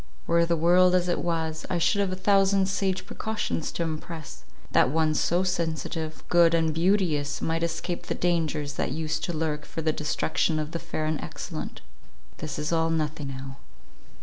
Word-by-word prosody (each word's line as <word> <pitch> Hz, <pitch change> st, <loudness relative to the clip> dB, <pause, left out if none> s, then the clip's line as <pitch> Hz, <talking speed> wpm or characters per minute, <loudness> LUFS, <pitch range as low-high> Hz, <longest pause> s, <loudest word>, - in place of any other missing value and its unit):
Were 170 Hz, 0 st, +3 dB
the 170 Hz, 0 st, +2 dB
world 180 Hz, +3 st, +5 dB
as 180 Hz, -1 st, +2 dB
it 175 Hz, -, +1 dB
was, 160 Hz, -2 st, -2 dB
I 180 Hz, -, 0 dB
should 200 Hz, +4 st, +2 dB
have 195 Hz, -2 st, 0 dB
a -, -, -1 dB
thousand 195 Hz, 0 st, +3 dB
sage 190 Hz, -1 st, -1 dB
precautions 215 Hz, -7 st, -3 dB
to 170 Hz, -, -1 dB
impress, 155 Hz, -, -6 dB, 0.3 s
that -, -, +4 dB
one 155 Hz, +1 st, +2 dB
so 175 Hz, +4 st, +2 dB
sensitive, 160 Hz, -3 st, -2 dB
good, 170 Hz, -1 st, +5 dB
and 160 Hz, -1 st, +2 dB
beauteous, 165 Hz, -4 st, +1 dB
might 165 Hz, 0 st, -1 dB
escape 170 Hz, +1 st, -3 dB
the -, -, -1 dB
dangers 160 Hz, -4 st, 0 dB
that -, -, -1 dB
used 160 Hz, +1 st, -2 dB
to -, -, -2 dB
lurk 155 Hz, -2 st, -2 dB
for 160 Hz, -, -6 dB
the 155 Hz, 0 st, +2 dB
destruction 155 Hz, +1 st, 0 dB
of 155 Hz, 0 st, -3 dB
the 170 Hz, -, -3 dB
fair 155 Hz, -, -3 dB
and 155 Hz, 0 st, -1 dB
excellent. -, -, -6 dB, 0.6 s
This 155 Hz, -1 st, -4 dB
is 150 Hz, +2 st, -2 dB
all 165 Hz, 0 st, +2 dB
nothing 155 Hz, -2 st, -1 dB
now. 135 Hz, 0 st, -7 dB
165 Hz, 180 wpm, -27 LUFS, 155-175 Hz, 0.6 s, world